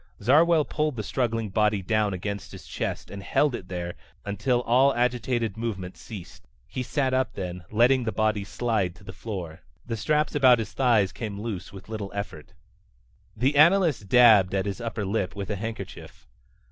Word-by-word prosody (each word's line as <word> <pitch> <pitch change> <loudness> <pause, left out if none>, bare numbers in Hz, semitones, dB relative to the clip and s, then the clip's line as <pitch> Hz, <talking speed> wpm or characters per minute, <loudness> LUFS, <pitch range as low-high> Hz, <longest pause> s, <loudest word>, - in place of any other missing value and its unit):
Zarwell 155 +7 +4
pulled 150 -2 -1
the 110 - -4
struggling 115 -3 -1
body 105 -1 +1
down 110 0 +1
against 100 +2 -5
his - - -10
chest - - -4
and 100 - -7
held 145 +7 +1
it 95 - -6
there 90 -1 -4 0.3
until 115 +5 0
all 130 +4 +4
agitated 120 -3 0
movement 100 -6 -4
ceased. 95 -7 -11 0.2
He 130 - -4
sat 130 +1 -1
up 130 -2 +1
then, 90 -2 -5
letting 120 +4 +3
the 110 - -1
body 110 -2 0
slide 105 -4 -1
to 90 - -17
the 95 - -9
floor. 90 -5 -6 0.2
The 115 - -3
straps 150 +7 0
about 130 -4 +6
his 110 -2 -5
thighs 115 -7 +3
came 105 -4 -6
loose 105 -5 -5
with 95 0 -12
little 105 -3 -5
effort. 100 -7 -6 0.8
The 130 +6 +1
analyst 155 - +4
dabbed 110 -7 +6
at 95 0 0
his 100 +3 -4
upper 115 -3 -3
lip 95 -1 -2
with 100 0 -5
a - - -1
handkerchief. 115 +3 -7
110 Hz, 175 wpm, -26 LUFS, 100-125 Hz, 0.8 s, about